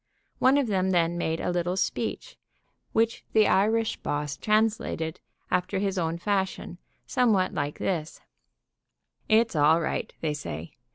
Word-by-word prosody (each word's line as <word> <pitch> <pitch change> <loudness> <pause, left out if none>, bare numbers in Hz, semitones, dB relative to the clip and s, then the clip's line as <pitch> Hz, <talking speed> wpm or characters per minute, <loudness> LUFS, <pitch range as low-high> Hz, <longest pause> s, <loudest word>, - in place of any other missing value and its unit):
One 265 +2 +5
of 285 - +2
them 190 -4 0
then 170 -2 +2
made 165 -1 -1
a - - -1
little 175 +1 -1
speech, - - -2 0.6
which 225 0 +1
the 215 -1 +5
Irish 220 +3 +2
boss 145 -1 -3
translated 215 -5 0 0.3
after 180 +2 0
his 195 -1 -1
own 165 0 -1
fashion, 190 -1 -2 0.3
somewhat 210 -7 +2
like 145 -4 -2
this: 165 -5 -3 1.1
"It's 225 -2 +3
all 155 +2 +5
right, 165 - -2
they 155 -2 0
say. 85 - -6
185 Hz, 135 wpm, -27 LUFS, 160-215 Hz, 1.1 s, One